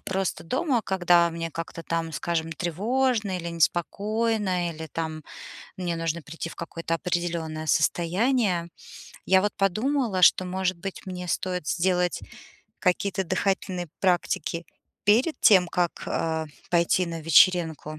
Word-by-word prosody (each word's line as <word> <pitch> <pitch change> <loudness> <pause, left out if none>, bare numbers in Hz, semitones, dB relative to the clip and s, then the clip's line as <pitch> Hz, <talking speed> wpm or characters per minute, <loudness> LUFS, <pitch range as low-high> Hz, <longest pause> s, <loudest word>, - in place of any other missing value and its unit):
просто 190 -1 -2
дома, 255 - 0
когда 175 -3 +3
мне 165 0 -4
как-то 165 +1 -6
там, 165 0 -2
скажем, 165 0 -2
тревожно 210 - 0
или 170 -1 -5
неспокойно, 190 +2 0
или 160 0 -7
там 160 -1 -4 0.6
мне 175 -2 -2
нужно 165 0 -2
прийти 165 +2 -7
в - - -11
какое-то 165 0 -4
определённое 165 -2 -2
состояние. 180 +3 +1 0.6
Я 190 0 +5
вот 205 +1 0
подумала, 215 +1 +1
что, 185 - +6
может 185 0 -1
быть, 190 +3 -7
мне 180 -1 -6
стоит 180 -2 -2
сделать 180 0 +1 0.6
какие-то 190 +1 0
дыхательные 185 -1 -1
практики 175 -2 0 0.4
перед 235 +10 +3
тем, 185 -5 +6
как, 175 -1 -1
э, 160 -1 -1 0.2
пойти 175 +1 +2
на 165 -1 -5
вечеринку. 160 -1 +3
180 Hz, 125 wpm, -26 LUFS, 165-195 Hz, 0.6 s, что